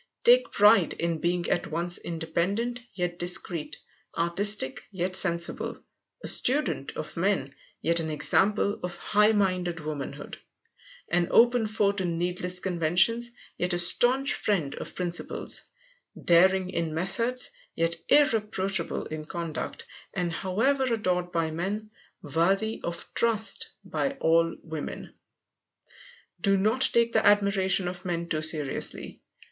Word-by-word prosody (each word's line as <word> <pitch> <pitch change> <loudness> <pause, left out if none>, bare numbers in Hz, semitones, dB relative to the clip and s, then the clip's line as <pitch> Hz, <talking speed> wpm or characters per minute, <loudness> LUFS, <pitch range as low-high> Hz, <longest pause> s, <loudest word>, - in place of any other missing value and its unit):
Take - - +5
pride 205 -3 +4
in 170 -1 -2
being 175 +1 -1
at - - -1
once 170 +2 -2
independent 175 +9 -2
yet 175 -2 -4
discreet; 175 -2 -1 0.4
artistic, 170 -1 +2
yet 185 -1 -3
sensible; 170 -3 -1 0.5
a - - -4
student 285 +4 +3
of - - -7
men, - - -1 0.3
yet 170 0 +2
an 160 -1 -3
example 200 +7 +2
of 180 -1 -5
high 210 +1 +3
minded 185 -4 0
womanhood; 150 -3 -7 0.7
an 175 0 +1
open 240 -1 +4
foe 210 -2 +1
to 200 -1 -4
needless 180 +1 0
conventions, 180 +7 +2 0.3
yet 180 0 0
a - - +1
staunch 250 +10 +5
friend 165 -10 -1
of - - -8
principles; 175 -1 -1 0.6
daring 185 +2 +4
in 165 -3 -3
methods, 230 +9 0 0.2
yet 165 0 0
irreproachable 210 - +1
in 155 0 -6
conduct; 165 -2 -6 0.3
and 175 -3 -2
however 255 +10 0
adored 180 -5 -1
by 165 -2 -1
men, 200 +6 -4 0.3
worthy 190 +9 0
of 170 0 -5
trust 225 -2 +1 0.2
by 275 - -2
all 165 -9 +1
women. 160 -2 -7 1.3
Do 195 -1 +3
not 220 +7 +1
take 235 0 +2
the 220 - +2
admiration 195 -2 +2
of 180 0 -6
men 170 -2 -3
too 155 - -1
seriously. 155 -3 -1
180 Hz, 125 wpm, -27 LUFS, 170-210 Hz, 1.3 s, Take